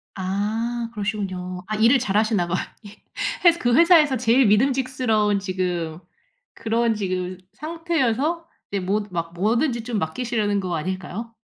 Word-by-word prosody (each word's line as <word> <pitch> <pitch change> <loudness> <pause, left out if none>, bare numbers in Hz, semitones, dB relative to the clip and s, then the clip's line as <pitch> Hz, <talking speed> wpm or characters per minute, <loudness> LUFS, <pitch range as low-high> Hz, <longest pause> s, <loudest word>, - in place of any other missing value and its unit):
아. 200 +4 -2 0.3
그러시군요. 190 -4 -4
아 215 - -2
일을 230 +5 +5
잘하시나 210 -4 +1
봐요. 180 +1 0 0.3
예. 205 - -11 0.5
회사 345 -1 +6
그 240 -1 +2
회사에서 325 -4 +6
제일 245 +2 +4
믿음직스러운 230 -3 +2
지금 180 -4 -3 0.6
그런 230 0 +1
지금 185 -2 -3 0.2
상태여서 325 -1 -1 0.2
이제 200 - -1
뭐 200 +3 0
막 170 -1 -4
뭐든지 235 - 0
좀 230 -2 -2
맡기시려는 205 +3 -1
거 180 -2 -2
아닐까요? 185 +7 -5
215 Hz, 310 characters per minute, -23 LUFS, 185-250 Hz, 0.6 s, 회사